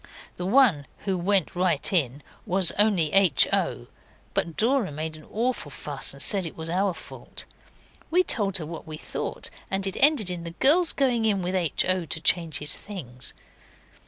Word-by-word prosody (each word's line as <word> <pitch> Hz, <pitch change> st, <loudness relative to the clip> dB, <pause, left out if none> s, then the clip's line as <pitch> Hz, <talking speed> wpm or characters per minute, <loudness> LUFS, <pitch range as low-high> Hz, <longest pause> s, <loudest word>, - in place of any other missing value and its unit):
The 180 Hz, -, -4 dB
one 200 Hz, -, +3 dB, 0.2 s
who 195 Hz, -2 st, 0 dB
went 185 Hz, 0 st, 0 dB
right 180 Hz, -2 st, 0 dB
in 145 Hz, -5 st, 0 dB, 0.2 s
was 185 Hz, -1 st, +4 dB
only 195 Hz, -8 st, +3 dB
H. 190 Hz, -8 st, +6 dB
O.; -, -, -1 dB, 0.5 s
but 165 Hz, -2 st, -2 dB
Dora 235 Hz, -, +1 dB
made 155 Hz, +2 st, -5 dB
an 155 Hz, -, -14 dB
awful 240 Hz, +4 st, -2 dB
fuss -, -, -3 dB
and -, -, -10 dB
said 200 Hz, -3 st, +1 dB
it 165 Hz, -, -7 dB
was 160 Hz, 0 st, -5 dB
our 190 Hz, 0 st, 0 dB
fault. -, -, -8 dB, 0.6 s
We 360 Hz, +3 st, +3 dB
told 200 Hz, -, +2 dB
her 160 Hz, -, -6 dB
what 165 Hz, +1 st, -9 dB
we 155 Hz, -1 st, -6 dB
thought, -, -, -4 dB, 0.2 s
and 195 Hz, 0 st, -2 dB
it 195 Hz, 0 st, -4 dB
ended 275 Hz, -, +3 dB
in 175 Hz, -1 st, -5 dB
the 170 Hz, 0 st, -9 dB
girls 330 Hz, +5 st, +6 dB
going 245 Hz, -5 st, 0 dB
in 200 Hz, -4 st, +1 dB
with 180 Hz, +1 st, -3 dB
H. 175 Hz, -5 st, +1 dB
O. 185 Hz, -1 st, +1 dB
to 160 Hz, -, -2 dB
change 165 Hz, -2 st, +2 dB
his 150 Hz, +1 st, -1 dB
things. 130 Hz, -, -7 dB
185 Hz, 185 wpm, -25 LUFS, 160-210 Hz, 0.6 s, H